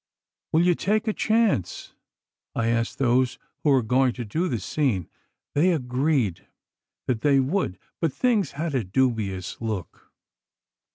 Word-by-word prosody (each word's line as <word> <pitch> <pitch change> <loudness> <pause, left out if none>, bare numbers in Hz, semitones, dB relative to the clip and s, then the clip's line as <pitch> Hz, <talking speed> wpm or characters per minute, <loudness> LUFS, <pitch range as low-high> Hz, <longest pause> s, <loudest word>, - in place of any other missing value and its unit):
'Will 160 +2 +4
you 180 - +5
take 215 +6 0
a 215 - +2
chance?' 215 - 0 0.6
I 115 0 +1
asked 115 0 0
those 130 0 +2 0.2
who 150 - +1
were 135 -3 +4
going 125 +2 +2
to 120 - -5
do 160 - -1
the 120 - -1
scene. 100 - -1 0.5
They 175 +5 +3
agreed 125 - 0 0.6
that 120 -4 -1
they 140 -2 +4
would, 135 - 0 0.2
but 165 -3 +1
things 230 - +1
had 155 +2 -3
a 130 -4 +1
dubious 100 -3 -1
look. 110 -6 -5
130 Hz, 145 wpm, -25 LUFS, 115-160 Hz, 0.6 s, you